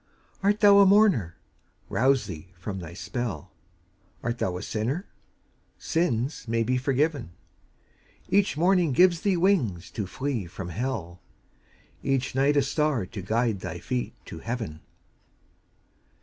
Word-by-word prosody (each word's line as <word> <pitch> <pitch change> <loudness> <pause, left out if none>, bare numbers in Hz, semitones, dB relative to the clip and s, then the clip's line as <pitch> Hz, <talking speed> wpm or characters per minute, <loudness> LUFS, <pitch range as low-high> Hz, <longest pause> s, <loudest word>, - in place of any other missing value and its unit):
Art 205 +2 +2
thou 200 -1 +8
a 200 - +8
mourner? 190 - +4 0.5
Rouse 135 +1 +2
thee 80 +2 -8
from 95 +2 -5
thy 85 -1 -8
spell; 115 - -4 0.7
Art 120 0 -2
thou 90 -1 -1
a - - -6
sinner? 130 - -2 0.7
Sins 135 -6 -1
may 115 0 +1
be 125 +3 0
forgiven; 135 - 0 0.9
Each 195 -5 +2
morning 175 -3 +3
gives 180 +3 +5
thee 195 -3 +2
wings 135 - +1
to 105 -4 -4
flee 130 -3 -3
from 90 +1 -7
hell, 90 -5 -4 0.8
Each 135 -1 0
night 140 +3 +3
a 140 - +4
star 140 - 0
to 100 +1 -7
guide 110 +2 0
thy 90 -2 -5
feet 120 +8 -3
to 80 - -8
heaven. 110 -8 -4
125 Hz, 135 wpm, -26 LUFS, 95-155 Hz, 0.9 s, thou